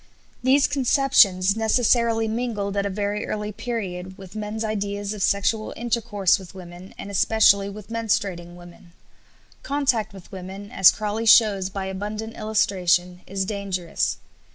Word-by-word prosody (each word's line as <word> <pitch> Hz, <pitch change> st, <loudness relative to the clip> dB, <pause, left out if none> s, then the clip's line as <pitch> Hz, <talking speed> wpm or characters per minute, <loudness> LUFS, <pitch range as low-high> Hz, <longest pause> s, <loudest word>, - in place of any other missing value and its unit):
These 270 Hz, +3 st, +4 dB
conceptions 240 Hz, -8 st, +3 dB
necessarily 225 Hz, 0 st, +2 dB
mingled 220 Hz, -3 st, -3 dB
at 200 Hz, 0 st, 0 dB
a -, -, -3 dB
very 205 Hz, +1 st, -3 dB
early 210 Hz, 0 st, -3 dB
period 195 Hz, -5 st, -5 dB
with 190 Hz, +1 st, -12 dB
men's 215 Hz, +1 st, -4 dB
ideas 205 Hz, -1 st, -3 dB
of 210 Hz, -, -7 dB
sexual 205 Hz, +3 st, 0 dB
intercourse 225 Hz, -5 st, +1 dB
with 190 Hz, 0 st, -13 dB
women 180 Hz, 0 st, -11 dB
and 200 Hz, -, -7 dB
especially 200 Hz, 0 st, +3 dB
with 210 Hz, +1 st, -10 dB
menstruating 195 Hz, -6 st, -2 dB
women. 175 Hz, -1 st, -15 dB, 0.7 s
Contact 275 Hz, -6 st, 0 dB
with 195 Hz, -1 st, -14 dB
women, 195 Hz, +2 st, -8 dB
as 190 Hz, -, +7 dB
Crawley 215 Hz, +2 st, -2 dB
shows 205 Hz, -4 st, +5 dB
by 195 Hz, 0 st, -5 dB
abundant 210 Hz, +4 st, -5 dB
illustration, 180 Hz, -5 st, 0 dB
is 195 Hz, 0 st, -2 dB
dangerous. 195 Hz, -4 st, -2 dB
205 Hz, 135 wpm, -23 LUFS, 190-220 Hz, 0.7 s, as